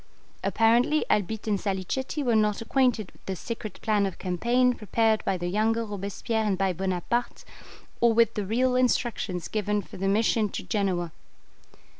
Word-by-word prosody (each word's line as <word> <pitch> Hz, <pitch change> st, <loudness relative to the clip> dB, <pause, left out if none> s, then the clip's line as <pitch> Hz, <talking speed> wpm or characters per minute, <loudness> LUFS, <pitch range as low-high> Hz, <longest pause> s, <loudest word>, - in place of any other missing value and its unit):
Apparently 240 Hz, +7 st, +3 dB
Albitte 210 Hz, +2 st, 0 dB
and 210 Hz, -3 st, 0 dB
Salicetti 210 Hz, -, -2 dB
were 240 Hz, -3 st, +2 dB
not 210 Hz, -1 st, +2 dB
acquainted 230 Hz, -4 st, +1 dB
with -, -, -25 dB
the 190 Hz, -, -2 dB
secret 225 Hz, +3 st, -6 dB
plan 210 Hz, -3 st, +2 dB
of 190 Hz, -, -7 dB
campaign 240 Hz, +8 st, +1 dB
prepared 220 Hz, 0 st, +1 dB
by 190 Hz, -, +1 dB
the 175 Hz, -, -5 dB
younger 220 Hz, +4 st, +1 dB
Robespierre 205 Hz, +2 st, -3 dB
and 205 Hz, -3 st, 0 dB
by 190 Hz, -1 st, +1 dB
Bonaparte, 190 Hz, +6 st, -2 dB, 0.5 s
or 235 Hz, -1 st, +5 dB
with 230 Hz, 0 st, +3 dB
the 210 Hz, -, -2 dB
real 250 Hz, +4 st, +2 dB
instructions 235 Hz, -8 st, 0 dB
given 210 Hz, -1 st, -1 dB
for -, -, -12 dB
the 195 Hz, +1 st, -1 dB
mission 215 Hz, +1 st, +2 dB
to -, -, -5 dB
Genoa. 185 Hz, -6 st, -1 dB
215 Hz, 160 wpm, -26 LUFS, 195-235 Hz, 0.5 s, or